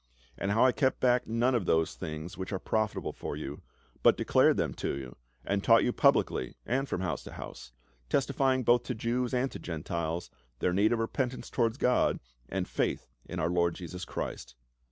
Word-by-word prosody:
And 95 - -2
how 110 +5 +4
I 130 - +6
kept 130 0 +1
back 125 -1 +3
none 120 +3 +2
of 110 -7 0
those 80 0 +2
things 80 +4 -6
which 95 +1 -5
are 95 - 0
profitable 110 +2 -1
for - - -5
you, 75 -1 -6 0.4
but - - +5
declared - - +4
them - - 0
to - - -3
you, 65 -3 -8 0.3
and 100 0 0
taught 115 0 +6
you 125 - +1
publicly 65 - +2
and 135 +2 0
from 90 - -2
house 85 -4 -2
to - - -9
house; - - -9 0.4
testifying 135 -1 +2
both 120 +1 +5
to 125 - -3
Jews 120 +2 -1
and 130 +1 0
Gentiles 85 0 -3 0.3
their 90 - 0
need 100 +4 +3
of 120 - +2
repentance 125 +3 -2
towards 115 -1 +1
God 125 -3 +2 0.3
and - - -2
faith - - -1 0.2
in - - -5
our 85 - +1
Lord 85 -1 +2
Jesus 90 0 -7
Christ. - - -5
110 Hz, 190 wpm, -30 LUFS, 85-125 Hz, 0.4 s, I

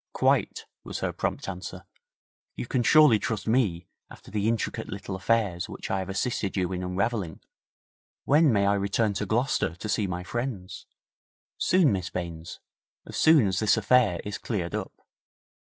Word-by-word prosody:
'Quite,' - - +1 0.2
was - - -6
her - - -1
prompt - - -3
answer. - - -7 0.7
'You - - -4
can 130 - 0
surely 140 -3 +6
trust 110 +1 -3
me 105 -8 +1 0.2
after - - -14
the 105 0 0
intricate 115 -1 -2
little 100 0 -5
affairs 95 -2 0
which - - -6
I 95 - +1
have 95 0 -5
assisted 100 0 -2
you 90 -1 0
in 90 -1 -3
unravelling? 95 -1 -2 0.9
When 150 +1 +5
may 100 -3 +2
I 100 - +3
return 100 +2 0
to 95 - -3
Gloucester 110 - 0
to 95 - -7
see 105 -1 0
my 90 -1 -4
friends?' 115 -3 -5 0.7
'Soon, 180 -7 +4
Miss 95 -3 -2
Baines 85 -2 -6 0.5
as - - -9
soon 155 -7 +5
as 95 -1 0
this 110 0 +3
affair 110 -4 +3
is 105 -1 -4
cleared 95 -6 -3
up. 105 -3 -6
100 Hz, 165 wpm, -27 LUFS, 90-115 Hz, 0.9 s, surely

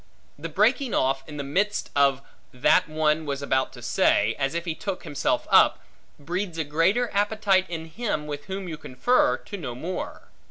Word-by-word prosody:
The 165 +3 -5
breaking 230 - +2
off, 135 +1 +1
in 150 - -7
the 140 - -3
midst 200 +9 -1
of 140 -1 +3 0.3
that 125 +5 +3
one 155 0 +1
was 140 0 -3
about 130 -1 0
to - - -12
say, 105 +2 +2
as 135 +3 -1
if 170 +1 -2
he 165 - -1
took 195 +3 -5
himself 145 - -1
up, - - +6 0.4
breeds 175 +4 -4
a 160 - 0
greater 165 +11 +1
appetite 205 -2 +2
in 165 -2 -5
him 165 -3 -3
with 145 -1 -6
whom 190 -1 -5
you 160 -3 -5
confer, 250 - +2
to 205 - -8
know 125 -9 -6
more. 170 +9 -6
160 Hz, 185 wpm, -25 LUFS, 140-195 Hz, 0.4 s, up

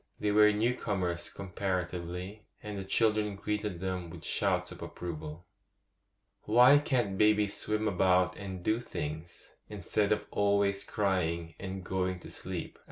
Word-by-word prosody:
They 105 - +1
were 105 0 +6
new 110 +4 +2
comers 90 -7 -2
comparatively, 90 +1 -4 0.2
and 105 -1 -5
the 100 - -4
children 105 +1 +1
greeted 105 -2 -3
them 90 -2 -3
with 85 -1 -10
shouts - - 0
of - - -10
approval. 80 -1 -6 1.0
'Why 125 +6 +7
can't 120 -9 0
babies 105 -1 +4
swim 110 0 -1
about 90 -1 +3
and 95 -3 -7
do 110 +4 +2
things, 80 -6 -6 0.2
instead 105 +1 0
of 105 - +1
always 100 -1 +2
crying 85 -5 -1
and 95 -1 -5
going 95 0 -1
to - - -10
sleep? - - -6
95 Hz, 140 wpm, -31 LUFS, 90-105 Hz, 1.0 s, Why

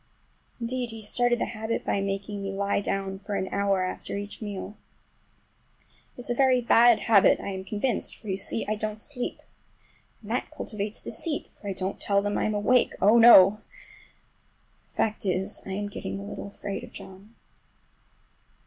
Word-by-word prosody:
Indeed, 245 +1 -2
he 225 0 -8
started 240 +3 +1
the - - -1
habit 220 0 -4
by 200 - 0
making 195 +1 -3
me 195 0 -3
lie 200 +1 0
down 195 -1 -2
for 200 +1 -5
an 190 - -1
hour 200 -2 +1
after 185 - -4
each 205 +2 -7
meal. 205 -1 -6 1.4
It - - -7
is 245 - -4
a - - +3
very 260 0 +4
bad 235 -1 +5
habit, 210 -4 +5
I - - -5
am 190 -1 -5
convinced, 210 +4 -1
for, 215 - -14
you 190 - 0
see, 200 +3 0
I 215 - +1
don't 215 0 -3
sleep. 250 +3 -5 0.8
And 210 - -8
that 250 - -1
cultivates 215 -8 -5
deceit, 320 -4 -3
for 205 - -12
I - - -1
don't 190 +1 -4
tell 200 0 +2
them 205 0 -1
I'm 215 - 0
awake,—oh, 225 0 +3
no! 210 -3 +8 1.3
The - - -30
fact 215 0 0
is, 190 -1 -2
I 190 - -4
am 205 +1 -3
getting 200 - -5
a - - -7
little 200 - -7
afraid 200 0 -6
of - - -10
John. 195 +4 -12
205 Hz, 175 wpm, -27 LUFS, 195-230 Hz, 1.4 s, no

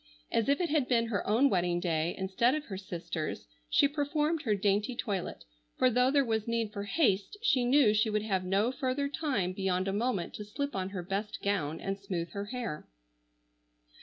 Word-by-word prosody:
As 230 - +1
if 280 - +3
it 350 -2 0
had 295 -5 +2
been 230 -2 +2
her 205 -4 -2
own 230 +7 +4
wedding 175 -6 +1
day 170 -1 0
instead 195 +8 +2
of 305 - -4
her 195 - -6
sister's, 170 -4 -5 0.2
she 285 - +5
performed 300 +2 0
her 220 -8 +1
dainty 205 +4 +1
toilet, 200 -7 -3 0.3
for 255 - +4
though 250 +2 +3
there 280 0 +3
was 220 -2 -1
need 230 -2 -1
for 200 -2 -4
haste, 205 - +1
she 260 - +3
knew 250 -4 +5
she 215 +1 +2
would 210 0 0
have 190 -4 0
no 195 +6 +1
further 265 +2 -1
time 275 - -1
beyond 190 -1 0
a 195 - 0
moment 210 -4 -1
to 210 - -6
slip 280 +7 -4
on 190 -1 -2
her 190 -3 -5
best 200 +4 -4
gown 170 -7 0
and 195 0 -3
smooth 180 -4 -4
her 200 0 -4
hair. 230 -8 -5
210 Hz, 195 wpm, -31 LUFS, 190-255 Hz, 0.3 s, she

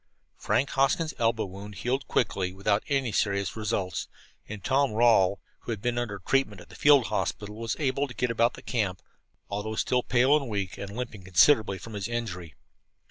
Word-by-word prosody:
Frank 135 - +1
Hoskins' 145 +4 +1
elbow 115 -1 +1
wound 100 +2 -9
healed 130 +7 -2
quickly, 95 -6 0
without 100 +2 +1
any 135 -5 0
serious 100 -1 0
results; 95 -6 -2 0.4
and 105 -3 -7
Tom 135 +1 +2
Rawle, 110 -4 +4 0.2
who - - -6
had 110 - -3
been 120 +2 -1
under 110 -4 -3
treatment 105 +1 0
at - - -14
the - - -13
field 145 -4 +5
hospital, 105 0 -3
was 115 0 -2
able 140 -1 0
to 125 - -11
get 125 -1 0
about 115 +1 +2
the - - -12
camp, 100 -7 -2 0.4
although 105 +2 -4
still 125 +3 +1
pale 130 +4 +3
and 140 -5 -1
weak, 100 -1 -3
and 100 +2 -7
limping 120 -5 -5
considerably 95 +3 +4
from 115 +3 -10
his 100 -1 -3
injury. 95 -9 -4
110 Hz, 185 wpm, -27 LUFS, 100-125 Hz, 0.4 s, field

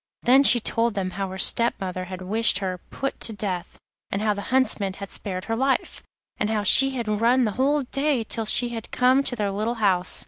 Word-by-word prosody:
Then 260 +3 +5
she 250 -3 +6
told 230 0 0
them 185 -2 -3
how 195 +1 -4
her 190 - -7
stepmother 190 -4 0
had 185 0 -8
wished 215 +2 +3
her 185 -2 -4
put 275 0 -5
to 225 - +1
death, 190 -4 -5 0.3
and 195 - -3
how 210 0 0
the 205 - -6
Huntsman 250 -7 +1
had 200 0 -9
spared 185 -3 -4
her 225 - -2
life, 265 +3 -1 0.4
and 210 - -2
how 215 -2 -1
she 270 +7 +5
had 235 -3 -4
run 250 +2 +3
the 215 - 0
whole 280 +6 0
day 275 -1 -1
till 225 0 0
she 245 +2 +2
had 230 -2 -7
come 255 +2 +2
to 260 - +1
their 205 -4 -2
little 215 +4 -2
house. 190 -5 0
220 Hz, 215 wpm, -23 LUFS, 195-250 Hz, 0.4 s, she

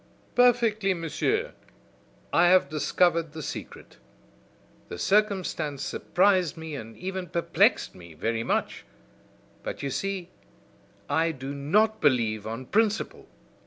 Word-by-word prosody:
"Perfectly, 230 -5 +3
monsieur. 415 - -1 0.8
I 175 +1 +5
have 185 +1 +5
discovered 165 +1 +1
the 160 -1 -6
secret. - - -8 0.9
The - - -6
circumstance 185 - 0
surprised 185 -3 +1
me 160 -1 -7
and 115 -5 -8
even 190 0 -4
perplexed 170 +1 +2
me 85 -3 -13
very 115 +7 -1
much; - - -1 0.8
but - - -6
you 140 - -2
see, 195 +2 -3 0.8
I 160 +3 +1
do 135 -2 -6
not 210 +10 +1
believe 110 -6 +2
on 115 +4 -5
principle. 215 - 0
165 Hz, 115 wpm, -27 LUFS, 140-195 Hz, 0.9 s, I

